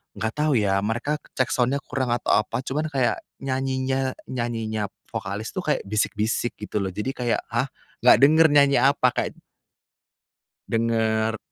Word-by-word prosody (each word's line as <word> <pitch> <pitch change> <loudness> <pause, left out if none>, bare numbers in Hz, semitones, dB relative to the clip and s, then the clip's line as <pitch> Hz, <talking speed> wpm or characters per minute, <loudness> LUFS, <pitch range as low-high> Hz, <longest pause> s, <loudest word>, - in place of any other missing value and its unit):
enggak 110 +2 -2
tahu 150 -2 +2
ya 100 -3 +2
mereka 120 +9 -1 0.2
check 130 - +1
sound-nya 130 +3 +1
kurang 130 -3 -1
atau 120 - -1
apa. 115 +4 -3
Cuman 150 +4 -2
kayak 135 -4 0 0.2
nyanyinya 130 0 -1 0.2
nyanyinya 115 -4 -2 0.2
vokalis 105 -1 -4
tuh 185 - -4
kayak 150 - +1
bisik-bisik 110 +3 -1
gitu 105 0 -4
loh. 95 - -1
Jadi 105 +5 -2
kayak 120 -3 -1
"Hah! 120 +4 0 0.3
Gak - - +7
denger 160 +3 +7
nyanyi 140 -3 +5
apa?" 130 -1 +4
kayak - - -3 1.3
denger 110 -1 +1
120 Hz, 145 wpm, -24 LUFS, 110-135 Hz, 1.3 s, Gak